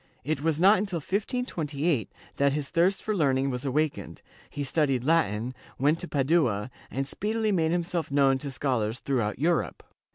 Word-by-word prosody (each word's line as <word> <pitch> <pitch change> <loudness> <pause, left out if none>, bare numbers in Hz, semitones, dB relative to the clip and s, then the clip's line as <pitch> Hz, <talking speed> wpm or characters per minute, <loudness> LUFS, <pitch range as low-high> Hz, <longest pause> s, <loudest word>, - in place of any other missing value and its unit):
It 145 +1 -2
was 160 0 0
not 195 +4 +6
until 195 -3 -2
1528 165 - -2 0.3
that 140 0 +3
his 145 -2 -3
thirst 180 +3 +2
for 215 - -1
learning 135 -5 +2
was 125 +2 -4
awakened, 150 +3 -2 0.3
he 145 - -4
studied 135 -3 +1
Latin, 125 -6 +1 0.2
went 150 +5 +2
to 180 - -5
Padua, 130 -7 +1 0.2
and 135 +2 -2
speedily 215 +8 -1
made 165 -5 +2
himself 175 -1 -1
known 135 -1 +3
to 140 - -5
schol 130 -2 -1
ars 110 +3 -2
throughout 120 -6 -1
Europe. 165 +5 0
145 Hz, 165 wpm, -27 LUFS, 135-170 Hz, 0.3 s, not